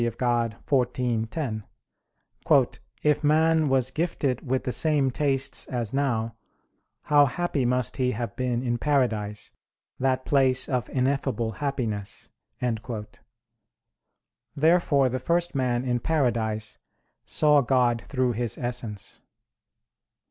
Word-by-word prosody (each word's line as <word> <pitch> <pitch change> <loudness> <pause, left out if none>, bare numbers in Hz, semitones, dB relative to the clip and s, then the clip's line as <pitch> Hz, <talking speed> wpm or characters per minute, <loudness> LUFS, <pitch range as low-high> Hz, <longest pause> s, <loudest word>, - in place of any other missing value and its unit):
Dei 120 - +2
xiv, 120 0 0
10): 115 -9 -3 1.4
"If 150 0 +2
man 160 0 +3
was 130 -1 +2
gifted 140 -5 -1
with 130 0 -1
the 125 - -2
same 145 -2 +2
tastes 135 -1 0
as 120 -3 -3
now, 115 -5 0 0.7
how 145 -1 +5
happy 150 -2 -1
must 125 0 0
he 130 -2 +1
have 115 +2 -4
been 125 -1 -1
in 120 -2 -1
paradise, 110 -8 0 0.5
that 130 0 0
place 130 -2 +2
of 125 -4 -2
ineffable 130 -3 0
happiness!" 115 -6 -4 2.2
Therefore 155 -3 +3
the 130 +1 -2
first 170 +6 0
man 125 -2 0
in 120 -1 0
paradise 115 -7 -1 0.4
saw 150 -2 +4
God 125 -2 +2
through 130 -3 0
His 120 -1 -2
Essence. 120 -4 -3
130 Hz, 110 wpm, -26 LUFS, 120-140 Hz, 2.2 s, how